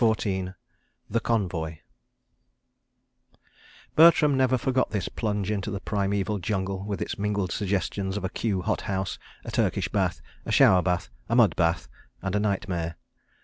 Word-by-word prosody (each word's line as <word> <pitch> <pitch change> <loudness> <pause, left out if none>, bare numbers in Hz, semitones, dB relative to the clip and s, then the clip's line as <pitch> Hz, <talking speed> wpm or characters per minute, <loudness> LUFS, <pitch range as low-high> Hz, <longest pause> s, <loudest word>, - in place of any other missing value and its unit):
CHAPTER 110 -1 +5 0.2
XIV 95 0 -3 0.6
The 115 - +2
Convoy 90 -9 -1 2.2
Bertram 155 -3 +7
never 130 -1 +3
forgot 130 +1 +1
this 105 -4 -2
plunge 105 -2 -2
into 100 -1 -2
the 100 -2 -3
primeval 100 0 -1
jungle 95 0 -2
with 100 -2 -2
its - - -5
mingled 100 -3 -1
suggestions 100 0 -1
of 105 - -4
a 95 - -1
Kew 100 -3 -1
hot - - 0
house, 95 -1 -2 0.3
a - - -5
Turkish - - +1
bath, - - 0 0.2
a - - -4
shower 90 -1 +6
bath, 90 -1 -1 0.2
a 115 - +2
mud 115 -8 +5
bath 85 -1 +1 0.4
and 95 -1 -2
a - - +3
nightmare. 95 -5 -1
100 Hz, 150 wpm, -26 LUFS, 95-105 Hz, 2.2 s, Bertram